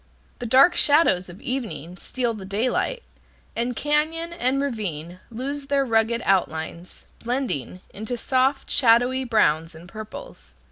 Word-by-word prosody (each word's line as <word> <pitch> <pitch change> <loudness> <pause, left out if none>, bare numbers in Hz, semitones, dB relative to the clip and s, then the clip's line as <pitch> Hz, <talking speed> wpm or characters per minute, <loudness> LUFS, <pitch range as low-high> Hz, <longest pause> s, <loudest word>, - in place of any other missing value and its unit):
The 245 - -4
dark 270 +9 +6
shadows 285 - +3
of 175 +3 -11
evening 180 - -4
steal 240 +4 -2
the 210 -3 -8
daylight, 240 - -1 0.5
and 240 +1 -1
cañon 315 +4 0
and 260 0 +1
ravine 185 - -3
lose 275 +4 -5
their 280 -1 +2
rugged 225 0 +1
outlines, 170 -2 -1 0.2
blending 235 - -2
into 220 +4 -4
soft, 260 +3 +1
shadowy 250 +1 +4
browns 165 -8 +2
and 165 +2 -12
purples. 215 - -9
235 Hz, 130 wpm, -24 LUFS, 190-270 Hz, 0.5 s, dark